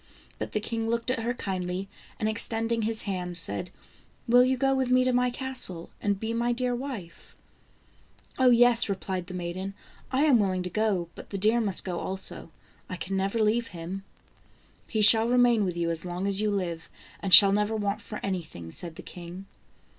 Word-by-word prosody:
But - - -5
the 215 - +1
king 225 +1 -3
looked 235 +1 0
at 255 - -1
her 230 +1 -1
kindly, 185 -3 -3 0.3
and 215 - 0
extending 225 +1 -1
his 220 0 -1
hand, 180 -3 -2
said: 165 - -1 0.6
"Will 245 +1 +6
you 260 +1 +1
go 270 +1 +2
with 265 -2 0
me 255 0 +4
to 255 0 +1
my 250 0 +2
castle 245 -10 -3
and 200 -1 0
be 225 +2 -3
my 240 +1 0
dear 250 0 -1
wife?" 240 -9 -7 1.0
"Oh, 260 -1 +6
yes!" 240 -1 +5
replied 190 -2 -3
the 185 - -7
maiden, 185 +2 -5 0.2
" - - -27
I 265 +2 +2
am 280 -6 +5
willing 185 -3 0
to 180 - -5
go, 200 -5 0
but - - -12
the 200 - -4
deer 215 +4 +2
must 200 -4 +1
go 180 -2 -3
also; 190 -2 -4 0.4
I 185 - -4
can 190 +2 -4
never 195 +3 -1
leave 230 +2 +1
him." 180 +3 -7 0.4
" - - -33
He 220 -2 0
shall 220 +2 +7
remain 245 -3 +4
with 180 -2 -3
you 170 -1 0
as 165 -1 -4
long 180 +1 -4
as 200 0 +2
you 215 - +1
live, 175 -5 -3 0.3
and 195 - -4
shall 195 +3 +10
never 210 +2 +1
want 205 -1 -2
for 215 - -7
anything," 160 - -5
said 170 - -5
the - - -10
king. 175 +2 -9
205 Hz, 200 wpm, -27 LUFS, 180-235 Hz, 1.0 s, shall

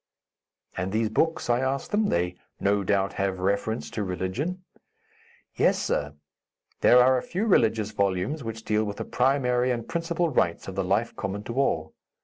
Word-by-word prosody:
"And 95 +1 -2
those 110 +1 +1
books?" 160 +9 0
I 120 0 +2
asked 130 +1 -2
them; 210 0 +2
"they, 90 +1 0 0.2
no 100 0 +1
doubt, 100 0 +1
have 95 -1 0
reference 100 +4 -1
to 105 - -2
religion." 100 - -3 0.9
"Yes, - - +3
sir. - - -2 0.6
These - - +5
are 125 +1 +6
a - - -6
few 190 +5 -2
religious 110 - +2
volumes 100 +9 -1
which 115 -1 -6
deal 105 0 +1
with 105 -1 -4
the - - -4
primary 125 -1 +1
and 120 -2 -2
principal 170 0 -1
rites 85 - 0
of 95 - -5
the 95 +1 -1
life 100 +5 0
common 100 +1 -4
to 115 - -6
all. 80 -12 0
110 Hz, 170 wpm, -26 LUFS, 100-135 Hz, 0.9 s, are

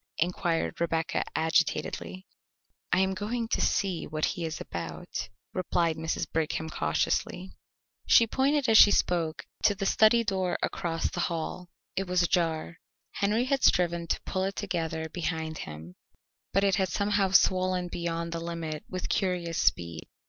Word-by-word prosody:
inquired 170 -1 -1
Rebecca 165 -1 0
agitatedly. 170 +3 0 0.7
"I 185 - +4
am 190 0 +1
going 225 +4 -3
to - - +1
see 195 -4 0
what 155 0 -1
he 170 - -2
is 160 -2 -4
about," 80 +1 -6 0.2
replied 170 -3 0
Mrs. 160 +1 -2
Brigham 160 0 -2
cautiously. 175 - -1 0.6
She 230 - +7
pointed 270 +4 +1
as 220 -1 +7
she - - +10
spoke 170 -5 0 0.2
to 205 - +3
the 195 0 -3
study 220 +3 +5
door 190 -4 0
across 165 -3 -1
the - - -4
hall; 170 +1 -4 0.3
it 195 0 -1
was 180 0 +2
ajar. 165 -2 0 0.3
Henry 215 +5 +1
had 270 0 0
striven 170 -1 +3
to - - 0
pull 185 - -1
it 195 +1 -3
together 165 -5 -2
behind 160 -1 -3
him, 80 +3 -8 0.6
but 195 - +2
it 195 -2 +3
had 190 -2 +1
somehow 200 +3 +1
swollen 185 -1 +3
beyond 170 -1 -3
the 165 - -3
limit 165 -2 -5
with 185 -1 -4
curious 180 -4 -1
speed. 85 -2 0
175 Hz, 150 wpm, -28 LUFS, 160-195 Hz, 0.7 s, she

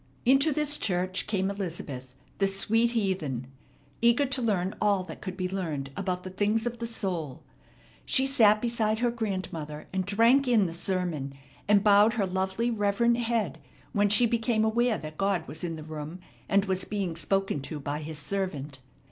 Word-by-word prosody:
Into 270 +5 +5
this 295 0 +2
church 185 -1 -1
came 195 -2 0
Elizabeth, 155 -10 -5 0.2
the 195 - +3
sweet 225 +5 +2
heathen, 180 - -1 0.6
eager 235 +4 +4
to 270 -1 -1
learn 195 -5 0
all 200 -3 +2
that 175 - -10
could 185 -1 -6
be 185 -2 -1
learned 160 -8 -4
about 185 -2 -2
the 185 - -7
things 210 +4 0
of 240 -1 -3
the 230 - -3
soul. 175 - -4 0.6
She 265 - +3
sat 220 -5 +4
beside 225 -2 +1
her 240 +1 +1
grandmother, 185 -9 -4
and 190 -1 0
drank 230 +8 +4
in 230 -5 +4
the 165 - -3
sermon, 170 -6 -2 0.3
and 205 -1 +4
bowed 210 +1 +6
her 215 -4 0
lovely, 190 +5 -1
reverent 225 +2 +2
head 230 - -1 0.3
when 205 0 +3
she 210 +4 +5
became 225 -1 +1
aware 235 0 +2
that 155 0 -9
God 195 -4 0
was 160 - -7
in 165 -2 -3
the 155 - -8
room 155 +2 -7 0.3
and 200 0 +3
was 190 -1 0
being 195 -5 -3
spoken 195 -1 0
to 150 +2 -6
by 145 +1 -3
His 155 0 -6
servant. 150 -5 -3
195 Hz, 175 wpm, -28 LUFS, 170-225 Hz, 0.6 s, bowed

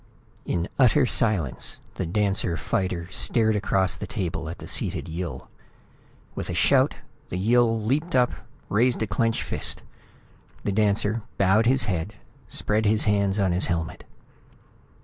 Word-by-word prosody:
In 85 +1 -1
utter 130 +2 +5
silence 105 - +1 0.2
the - - -3
dancer 95 -2 0
fighter 90 0 -2
stared 110 +2 +1
across 95 -2 +1
the - - -7
table 80 -4 -3
at 85 - -6
the - - -10
seated - - -1
Yill. 80 -5 -5 0.9
With - - -5
a - - -3
shout, - - +3 0.3
the 90 - -3
Yill 115 +3 +3
leaped 145 +10 -1
up, 125 -1 +4 0.4
raised 120 +2 +2
a - - +1
clenched 115 +3 0
fist. - - -2 0.8
The 100 - -1
dancer 105 +2 +1 0.2
bowed 100 +4 +3
his 130 0 +5
head, 100 -1 -2 0.3
spread 105 +1 0
his 105 +1 +3
hands 100 -1 +1
on 95 -3 +2
his 90 +2 +2
helmet. 85 -2 -3
105 Hz, 145 wpm, -25 LUFS, 90-115 Hz, 0.9 s, utter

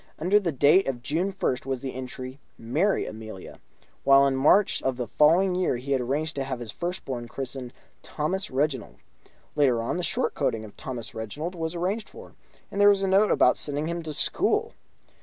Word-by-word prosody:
Under 185 +6 +3
the 180 -5 -1
date 150 +7 +4
of 125 -3 -3
June 170 +8 -1
1st 135 -9 -2
was 135 -1 -3
the 130 - -4
entry: 130 +1 -7 0.2
"Marry 155 - 0
Amelia"; 110 -3 -9 0.4
while 140 0 +6
in 135 -1 +1
March 170 +9 +4
of 130 -2 -1
the 125 - -2
following 170 +9 +4
year 180 -8 0
he 130 +3 -6
had 135 -2 +2
arranged 150 +6 -2
to 135 - 0
have 130 -2 -4
his 115 -3 -6
first 180 +2 -5
born 120 -3 -4
christened 130 -1 -6 0.3
Thomas 185 +6 -3
Reginald. 135 -1 -1 0.6
Later 135 -6 +3
on, 115 +9 -2
the 180 - -2
short - - -1
coating 115 -6 -1
of 105 - -13
Thomas 120 -4 -7
Reginald 145 - -5
was 165 -1 -4
arranged 195 +6 -2
for, 470 +2 -13 0.4
and 200 - -1
there 205 - +8
was 200 -1 +3
a - - +1
note 195 +3 +4
about 125 - +4
sending 145 +1 0
him 170 +1 -3
to 160 -1 -5
school. 150 - +1
140 Hz, 195 wpm, -26 LUFS, 130-175 Hz, 0.6 s, there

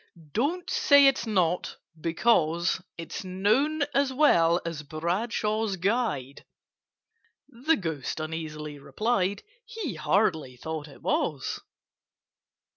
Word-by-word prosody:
"Don't 320 - -1
say 285 -1 +5
it's 270 -3 +3
not, 180 -5 0 0.2
because 170 -1 +2 0.2
It's 165 +2 -6
known 215 +12 +1
as 275 -1 +2
well 175 - +4
as 165 -3 -4
Bradshaw's 205 +7 -1
Guide!" 185 - -1 1.0
(The 285 +4 +1
Ghost 160 -6 -4
uneasily 155 -2 -5
replied 195 - -1 0.2
He 425 - -5
hardly 155 - 0
thought 160 +2 -5
it 140 - -15
was). - - -1
185 Hz, 100 wpm, -27 LUFS, 160-240 Hz, 1.0 s, say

